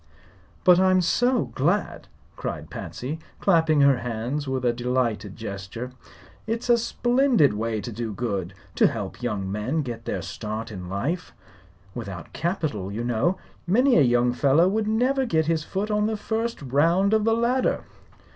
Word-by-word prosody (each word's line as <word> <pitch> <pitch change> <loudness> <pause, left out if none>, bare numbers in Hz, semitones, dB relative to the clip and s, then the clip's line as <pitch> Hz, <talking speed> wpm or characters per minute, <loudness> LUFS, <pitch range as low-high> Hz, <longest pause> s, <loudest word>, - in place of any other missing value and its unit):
"But 180 -1 +6
I'm 185 0 +4
so 245 +8 +2
glad!" 175 +10 0 0.3
cried - - -5
Patsy, 145 +6 -5 0.2
clapping 160 -5 +3
her 140 -2 +5
hands 125 +5 -3
with 130 -1 -2
a 120 - +3
delighted 120 -4 -1
gesture. 105 +3 -6 0.6
"It's 230 +2 -3
a 240 - +6
splendid 240 - +3
way 110 0 -2
to 120 - -6
do 115 0 -4
good 100 -5 -3 0.2
to - - +6
help 105 -1 -5
young 105 -6 -2
men 125 +10 -1
to 125 - -4
get 115 - -7
a - - -2
start 110 +1 -5
in 90 -3 -7
life. 145 - -3 0.6
Without 100 -7 -7
capital, 155 - -2
you 110 +4 -3
know, 120 +10 +1 0.3
many 245 +8 +4
a - - +6
young 120 -1 +3
fellow 140 +7 +4
would 210 +2 0
never 255 +5 +2
get 160 -10 +1
his 160 -1 0
foot 200 +5 -3
on 210 0 +2
the 220 -1 -1
first 225 -2 -3
round 165 - +2
of 220 -1 +3
the 225 +1 +3
ladder." 240 +3 +1
145 Hz, 165 wpm, -25 LUFS, -, 0.6 s, But